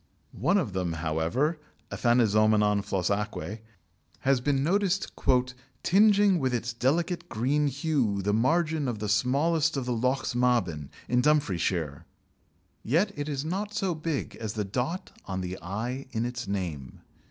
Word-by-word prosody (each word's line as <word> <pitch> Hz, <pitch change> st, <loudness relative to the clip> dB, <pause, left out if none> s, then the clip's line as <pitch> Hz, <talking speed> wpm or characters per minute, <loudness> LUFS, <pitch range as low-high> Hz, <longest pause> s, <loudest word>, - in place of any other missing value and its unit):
One 170 Hz, -, +3 dB
of 135 Hz, -, -1 dB
them, 90 Hz, -3 st, -1 dB
however, 80 Hz, -, 0 dB, 0.3 s
Aphanizomenon 110 Hz, -3 st, +3 dB
flos 95 Hz, -3 st, -1 dB
aquæ, 105 Hz, -1 st, -3 dB, 0.6 s
has 135 Hz, -2 st, +2 dB
been 135 Hz, 0 st, +1 dB
noticed 195 Hz, +3 st, 0 dB, 0.7 s
"tingeing 200 Hz, -1 st, +5 dB
with 130 Hz, -3 st, 0 dB
its 120 Hz, 0 st, -3 dB
delicate 160 Hz, +9 st, 0 dB
green 140 Hz, +6 st, +1 dB
hue 135 Hz, -8 st, 0 dB
the 105 Hz, +1 st, +1 dB
margin 155 Hz, +5 st, +1 dB
of 120 Hz, -3 st, -2 dB
the 105 Hz, 0 st, -4 dB
smallest 145 Hz, +9 st, +2 dB
of 130 Hz, -, -2 dB
the 125 Hz, -, -1 dB
Lochs 125 Hz, +3 st, 0 dB
Maben, 115 Hz, -, +1 dB, 0.2 s
in 125 Hz, +1 st, +2 dB
Dumfriesshire." 90 Hz, -, 0 dB, 0.8 s
Yet 170 Hz, -, +1 dB
it 145 Hz, 0 st, -4 dB
is 140 Hz, 0 st, -3 dB
not 200 Hz, +5 st, -3 dB
so 190 Hz, -2 st, 0 dB
big 155 Hz, -2 st, -3 dB
as 110 Hz, -2 st, -4 dB
the 105 Hz, -2 st, -2 dB
dot 130 Hz, -, -3 dB
on 95 Hz, -1 st, -3 dB
the 90 Hz, 0 st, -5 dB
i 120 Hz, +9 st, -4 dB
in 115 Hz, +1 st, -1 dB
its 120 Hz, -2 st, -4 dB
name. 85 Hz, -10 st, -4 dB
125 Hz, 145 wpm, -28 LUFS, 105-155 Hz, 0.8 s, tingeing